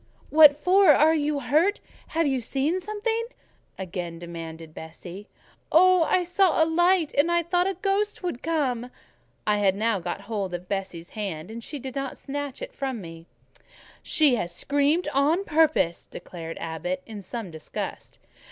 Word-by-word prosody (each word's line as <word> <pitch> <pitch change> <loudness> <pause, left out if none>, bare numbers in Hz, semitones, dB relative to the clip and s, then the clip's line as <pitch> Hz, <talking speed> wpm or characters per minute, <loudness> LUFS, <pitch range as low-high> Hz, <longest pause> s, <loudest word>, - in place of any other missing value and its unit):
"What 300 -2 +8
for? 370 +6 +4
Are 310 +3 +5
you 295 -2 0
hurt? 310 - +2 0.3
Have 330 0 0
you 265 -3 0
seen 280 +9 -1
something?" 425 +4 -2 0.5
again 175 -2 -5
demanded 165 -2 -8
Bessie. 175 +5 -10 0.4
"Oh! 365 +2 +6
I 365 - +2
saw 355 -2 +3
a - - +3
light, 345 0 +2
and 290 +5 +3
I 345 0 +2
thought 355 +2 +1
a 390 - -3
ghost 395 +2 -1
would 345 -9 -3
come." 260 -7 -1 0.6
I 210 0 +2
had 195 -2 +3
now 220 0 +1
got 180 - -4
hold 200 -3 -3
of 175 +1 -8
Bessie's 190 -4 -4
hand, 195 -5 -5
and 230 +1 -7
she 295 - -6
did 260 -1 -7
not 275 -1 -4
snatch 285 -1 -5
it - - -8
from 265 -3 -3
me. 165 -2 -10 0.7
"She 300 -4 +3
has 175 -4 -4
screamed 290 - +1
out - - -10 0.2
on 390 - -3
purpose," 300 - +2
declared 165 -2 -8
Abbot, 175 +3 -4
in 215 -3 -8
some 200 0 -6
disgust. 160 -1 -7
265 Hz, 165 wpm, -25 LUFS, -, 0.7 s, What